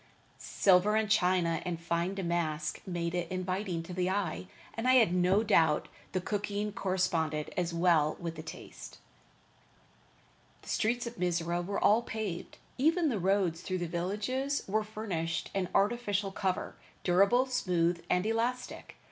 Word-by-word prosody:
Silver 195 +2 +3
and 215 -1 +1
china 180 -5 +2
and 175 -3 -3
fine 170 +3 -1
damask 170 -4 -2
made 170 -2 -2
it 175 -2 -2
inviting 185 -1 -2
to 180 - -8
the 180 0 0
eye, 185 - -2 0.3
and 225 +2 -2
I 255 - +6
had 225 -8 +5
no 180 +4 +3
doubt 165 -8 +3 0.2
the 185 - +1
cooking 205 +2 -2
corresponded 170 -6 -1
as 175 -1 -1
well 170 -3 +3
with 170 -1 -4
the 160 - -8
taste. 160 0 -10 1.7
The - - -11
streets 240 +2 0
of 235 0 -7
Mizora 175 -1 0
were 200 +3 -3
all 215 +3 +4
paved, 215 -7 -5 0.2
even 320 +3 +3
the 225 -6 -1
roads 185 -3 +1
through 185 0 -2
the 175 - -2
villages 210 - -2
were 215 +2 +1
furnished 195 -7 -3
an 185 -2 -1
artificial 205 -2 +1
cover, 190 -1 -2 0.3
durable, 200 +8 +4
smooth 175 -9 0
and 180 +2 +2
elastic. 235 +3 -2
185 Hz, 150 wpm, -31 LUFS, 170-210 Hz, 1.7 s, I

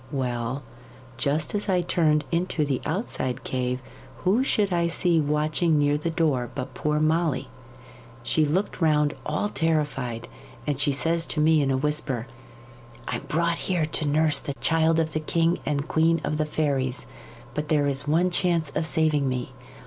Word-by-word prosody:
Well, 125 0 -2 0.5
just 145 +5 0
as 205 0 -2
I 180 -2 +3
turned 155 -3 +2
into 170 -2 0
the 135 -3 -1
outside 135 - -2
cave, 125 0 -2 0.4
who 205 +8 +3
should 205 -7 +1
I 170 -1 +2
see 170 -1 +2
watching 155 +2 +1
near 145 0 +3
the 150 +3 -2
door 150 -7 0
but 130 -1 -5
poor 150 +3 0
Molly. 155 - +1 0.7
She 155 +6 +2
looked 180 +6 -1
round 150 -2 +3
all 155 +7 0
terrified, 145 - -1 0.4
and 145 -2 -1
says 160 +4 +1
she - - -13
to - - 0
me 155 0 +4
in 140 - +1
a 135 - +2
whisper, 145 -4 -1 0.8
"I'm - - -3
brought 170 +1 0
here 175 -4 +2
to 155 0 -2
nurse 155 +1 +3
the 140 - -5
child 165 +1 +2
of 160 -1 0
the 155 - 0
king 165 +2 +1
and 145 0 -1
queen 165 +1 +3
of 150 - -1
the 155 - +1
fairies; 140 -3 -1 0.5
but 150 0 -3
there 150 -2 +3
is 140 +1 0
one 170 +4 +2
chance 170 -4 +1
of 160 +1 +1
saving 155 -4 +2
me. 125 -1 -3
150 Hz, 170 wpm, -25 LUFS, 140-165 Hz, 0.8 s, me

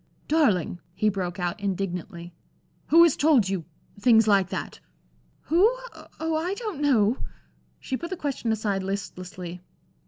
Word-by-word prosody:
"Darling," 210 - +2 0.2
he 215 - +2
broke 185 -2 -3
out, 175 +4 -2
indignantly, 180 -3 -4 0.5
"who 335 +2 +7
has 335 -4 +4
told 285 -9 +4
you 190 -3 -2 0.4
things 225 -1 +5
like 195 -3 +4
that?" - - -5 0.6
"Who? 335 +4 +1 0.6
Oh! 320 0 -1
I 345 +5 -1
don't 420 - -5
know." 245 -5 +3 0.6
She 265 - -3
put 340 +4 -6
the 375 - -4
question 275 -6 -2
aside 210 -3 -1
listlessly. 185 -2 -6
210 Hz, 135 wpm, -26 LUFS, 185-295 Hz, 0.6 s, who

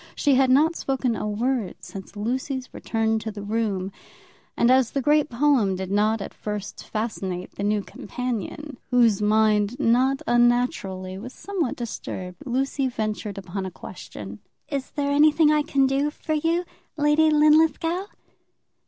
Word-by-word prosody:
She 285 - +2
had 260 0 +4
not 305 +6 +4
spoken 260 -5 -1
a 210 - -3
word 230 -1 -1
since 195 +1 -10
Lucy's 255 +4 -3
return 225 -1 0
to 220 +1 -5
the 205 -1 -8
room; 205 -3 -1 0.7
and 235 +1 +4
as 260 -2 +4
the 275 - +1
great 300 +1 +3
poem 245 -6 +2
did 190 0 -5
not 210 +1 +2
at - - -8
first 210 -2 -6
fascinate 195 -5 -3
the - - -8
new 205 0 +1
companion, 250 - -5
whose 230 -5 +4
mind 215 +2 +2
not 260 +2 +2
unnaturally 240 -6 +1
was 250 +5 -8
somewhat 370 -10 -3
disturbed, 185 -6 -6
Lucy 265 +2 0
ventured 215 -4 -3
upon 195 0 -5
a 190 - -4
question. 105 - -9 0.3
"Is 275 -3 -3
there 285 -1 -2
anything 300 +1 +5
I 300 0 +3
can 280 -3 +2
do 275 +2 +1
for 310 +1 -4
you, 330 +3 +1 0.3
Lady 295 +1 +4
Linlithgow?" 315 +4 +3
240 Hz, 150 wpm, -24 LUFS, 210-285 Hz, 0.7 s, anything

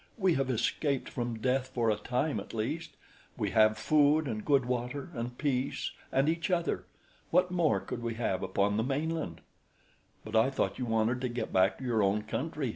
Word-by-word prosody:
We 190 -5 +3
have 135 -3 0
escaped 130 +3 0
from 120 -2 -3
death 130 +3 0
for 120 -3 +1
a - - +2
time 125 +7 -1
at - - -8
least. 155 +10 -3 0.4
We - - -1
have 110 0 +4
food 150 +6 +4
and 110 -3 -3
good 140 -3 +3
water 125 +5 -3
and 120 -1 -5
peace 135 -2 -1 0.2
and 135 +2 +2
each 165 +3 0
other. 170 -2 0 0.4
What 180 +1 +3
more 175 -3 +2
could 120 - -6
we 115 -1 -3
have 105 -5 -1
upon 100 +2 +1
the 110 - +1
mainland?" 140 - -2 0.8
"But 110 +1 -5
I 110 +4 +5
thought 135 - -1
you 125 - -1
wanted 115 +2 +1
to 125 - -1
get 120 -2 -4
back 95 +2 +3
to - - -9
your 120 -4 +1
own 100 +2 +2
country!" 140 +4 -3
125 Hz, 195 wpm, -31 LUFS, 110-145 Hz, 0.8 s, I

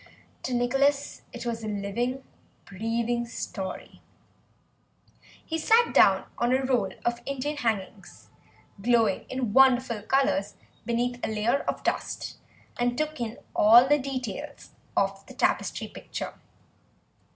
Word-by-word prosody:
To 255 - -2
Nicholas 275 +4 +1
it 240 0 -7
was 230 -1 -3
a - - -4
living, 215 +6 -2 0.4
breathing 230 +4 -2
story; 195 -4 -6 1.4
he 325 0 -2
sat 455 +8 +4
down - - +5
on 240 +1 +2
a 260 +1 +2
roll 235 -8 +1
of 240 0 0
Indian 275 +2 -2
hangings, 220 -8 -3 0.5
glowing 225 -3 +2
in 255 -5 -2
wonderful 255 -4 +4
colours 265 -4 +1 0.3
beneath 245 +1 -1
a - - +1
layer 220 +5 +1
of - - -2
dust, - - -3 0.4
and 245 0 +1
took 310 -1 -2
in 230 0 -3 0.2
all 235 +4 +7
the 295 +1 +4
details 255 -5 -5 0.3
of - - +1
the - - -12
tapestry - - 0
picture. - - -6
240 Hz, 125 wpm, -27 LUFS, 225-265 Hz, 1.4 s, all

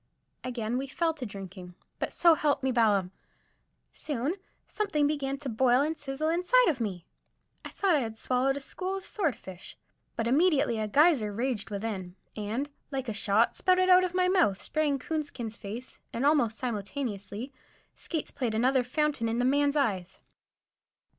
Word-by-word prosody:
Again 240 -1 -2
we 275 - -4
fell 325 +4 0
to 270 -6 -6
drinking. 190 -3 -9 0.2
But, - - -2
so 340 -1 +5
help 295 -3 +1
me 265 - +2
Balaam! 205 -6 +2 0.8
soon 285 +1 -2 0.3
something 310 -9 0
began 280 -2 -1
to 285 0 -7
boil 250 +2 +3
and 310 +3 0
sizzle 285 +1 -3
inside 365 +9 +4
of 285 -6 -1
me. 190 -7 -3 0.6
I - - -7
thought 390 -3 +1
I 300 - +4
had 225 -3 -4
swallowed 260 +3 +1
a - - -5
school 375 +7 -4
of 385 - -9
swordfish, 240 - -4 0.4
but 230 - -1
immediately 280 -4 +3
a 215 - -1
geyser 275 -3 +4
raged 230 0 -2
within, 200 -4 -4 0.2
and, 225 +7 -3 0.2
like 265 -3 -3
a - - -2
shot, 220 +1 +2
spouted 370 0 +3
out 365 0 +7
of 365 -1 -2
my 365 0 +3
mouth, 355 - +3
spraying 300 -2 0
Coonskin's 275 -6 -4
face; 230 +5 -8
and 240 +4 -2
almost 245 -7 +3
simultaneously 225 0 -4 0.4
Skates 320 -4 -4
played 235 -4 -2
another 255 +3 +3
fountain 280 -2 0
in 230 - -1
the 245 - +1
man's 285 +2 +2
eyes. 190 -10 0
260 Hz, 165 wpm, -29 LUFS, 220-300 Hz, 0.8 s, out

